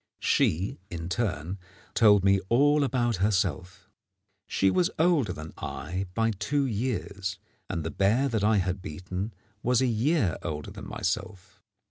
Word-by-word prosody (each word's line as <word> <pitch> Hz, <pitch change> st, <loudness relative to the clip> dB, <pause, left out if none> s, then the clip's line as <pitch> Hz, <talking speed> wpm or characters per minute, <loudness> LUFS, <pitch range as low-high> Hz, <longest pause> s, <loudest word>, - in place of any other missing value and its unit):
She 90 Hz, +5 st, +1 dB
in 85 Hz, 0 st, -5 dB
turn 95 Hz, -4 st, -2 dB, 0.3 s
told 105 Hz, -4 st, +6 dB
me 100 Hz, 0 st, +4 dB
all 145 Hz, +4 st, +4 dB
about 120 Hz, -5 st, +1 dB
herself. 95 Hz, -2 st, -1 dB, 0.6 s
She 95 Hz, -1 st, +2 dB
was 180 Hz, -, +2 dB
older 160 Hz, -, +3 dB
than 80 Hz, -3 st, -8 dB
I 90 Hz, +7 st, -4 dB
by 115 Hz, 0 st, +2 dB
two 135 Hz, +8 st, 0 dB
years, 100 Hz, -5 st, -2 dB, 0.3 s
and 85 Hz, -, -2 dB
the 80 Hz, -, -3 dB
bear 110 Hz, +8 st, +2 dB
that 110 Hz, -5 st, -1 dB
I 105 Hz, 0 st, +4 dB
had 95 Hz, 0 st, -1 dB
beaten 90 Hz, +6 st, -5 dB, 0.3 s
was 125 Hz, 0 st, +2 dB
a 130 Hz, -, +3 dB
year 120 Hz, -, +1 dB
older 75 Hz, -3 st, -5 dB
than -, -, -9 dB
myself. 95 Hz, +1 st, -4 dB
100 Hz, 145 wpm, -28 LUFS, 90-120 Hz, 0.6 s, told